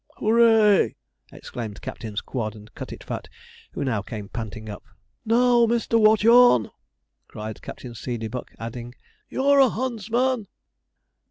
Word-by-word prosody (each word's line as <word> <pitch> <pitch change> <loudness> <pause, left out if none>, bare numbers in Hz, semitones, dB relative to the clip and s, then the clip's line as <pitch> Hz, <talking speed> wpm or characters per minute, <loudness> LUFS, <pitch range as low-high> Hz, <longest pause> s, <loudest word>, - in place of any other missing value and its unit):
'Hoo 220 +1 +1
ray!' 225 -3 +5 0.4
exclaimed 110 -4 -7
Captains 105 -2 -5
Quod 110 -4 -4
and 105 0 -14
Cutitfat, - - -7 0.5
who - - -3
now 120 -7 -1
came 105 -1 -8
panting 110 -1 -7
up. 105 -1 -8 0.4
'Now, 240 +1 +4
Mr. 230 0 +1
Watchorn!' 220 - +5 0.6
cried 110 0 -8
Captain 125 -2 -9
Seedeybuck, 115 0 -6
adding, 120 +2 -7 0.3
'You're 280 +1 +3
a 265 -2 +6
huntsman!' 235 0 -1
140 Hz, 115 wpm, -24 LUFS, -, 0.6 s, a